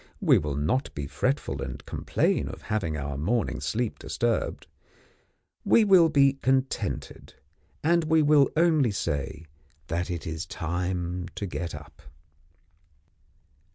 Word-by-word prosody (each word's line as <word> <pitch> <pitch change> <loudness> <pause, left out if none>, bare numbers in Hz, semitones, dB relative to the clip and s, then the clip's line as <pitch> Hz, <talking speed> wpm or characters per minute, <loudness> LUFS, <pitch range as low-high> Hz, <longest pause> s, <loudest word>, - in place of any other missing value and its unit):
We - - +5
will 75 -2 -3
not 125 - 0
be 70 - -4
fretful 70 - -1
and 65 0 -6
complain - - 0
of - - -8
having 95 -8 -2
our 70 -1 -4
morning 110 +10 -1
sleep 115 0 -2
disturbed; 115 -1 -1 1.0
we 230 - +5
will 185 -5 +6
be 140 -2 +3
contented, 130 0 -1 0.5
and 170 +1 +3
will 150 -3 +4
only 160 -6 +4
say 75 -5 -3 0.4
that 85 +2 -2
it 85 -3 -4
is 80 +1 -4
time 90 +1 -3
to 100 - -3
get 85 -3 -4
up. 75 0 -12
95 Hz, 120 wpm, -27 LUFS, -, 1.0 s, will